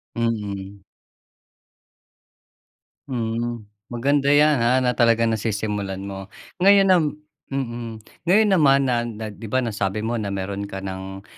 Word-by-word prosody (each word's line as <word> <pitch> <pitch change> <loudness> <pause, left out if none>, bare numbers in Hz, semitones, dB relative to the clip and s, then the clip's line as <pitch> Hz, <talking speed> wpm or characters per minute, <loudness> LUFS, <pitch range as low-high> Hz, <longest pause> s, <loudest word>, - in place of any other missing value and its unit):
Mm. 100 -4 -3 2.3
Hmm. 120 -2 -3 0.2
Maganda 140 +4 0
'yan, 145 0 +5
ah, 125 +2 +3
na 125 - +3
talagang 115 -1 +3
nasisimulan 105 -3 -2
mo. 95 -1 -7 0.3
Ngayon 195 +1 +6
nam 175 -3 +5 0.4
mm. 120 -4 -5 0.2
Ngayon 210 +4 +5
naman 140 -6 +5
na 120 -3 0
na 110 -1 -6
'di 110 +2 -9
ba, 130 +4 0
nasabi 105 -2 -2
mo 115 +1 -1
na 105 - -3
mayroon 100 +1 -4
ka 95 -1 -7
nang, 95 0 -6
115 Hz, 125 wpm, -23 LUFS, 100-130 Hz, 2.3 s, Ngayon